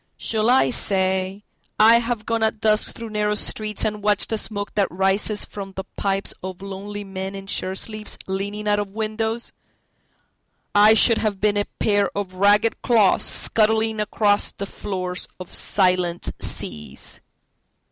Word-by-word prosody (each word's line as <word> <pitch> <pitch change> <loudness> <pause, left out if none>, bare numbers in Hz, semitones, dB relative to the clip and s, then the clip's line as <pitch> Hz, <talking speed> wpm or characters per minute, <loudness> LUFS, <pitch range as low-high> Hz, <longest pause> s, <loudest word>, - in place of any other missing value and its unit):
……..Shall 220 0 0
I 255 0 +4
say, 190 -2 0 0.4
I 225 +2 +7
have 235 -2 -3
gone 230 -1 -1
at 220 -1 0
dusk 215 -1 +2
through 230 -1 -8
narrow 210 0 0
streetsAnd 210 0 -1
watched 205 0 +2
the 220 - -1
smoke 205 -2 -4
that 200 -2 +2
rises 195 +3 0
from 195 -1 -8
the 190 - -5
pipesOf 195 -1 -3
lonely 200 +1 -6
men 190 0 -6
in 195 0 -8
shirt 190 -1 -2
sleeves, 215 0 -3
leaning 200 +2 -4
out 205 0 +2
of 200 -1 -5
windows?…I 220 -1 -2
should 230 0 +5
have 210 -3 -1
been 210 0 +2
a 205 - +1
pair 205 -2 +1
of 195 -2 -4
ragged 205 +4 +3
clawsScuttling 220 0 +3
across 210 -1 +2
the 200 - -6
floors 185 -2 -4
of 185 - -10
silent 180 -3 +1
seas. 75 0 -3
205 Hz, 140 wpm, -22 LUFS, 195-215 Hz, 0.4 s, I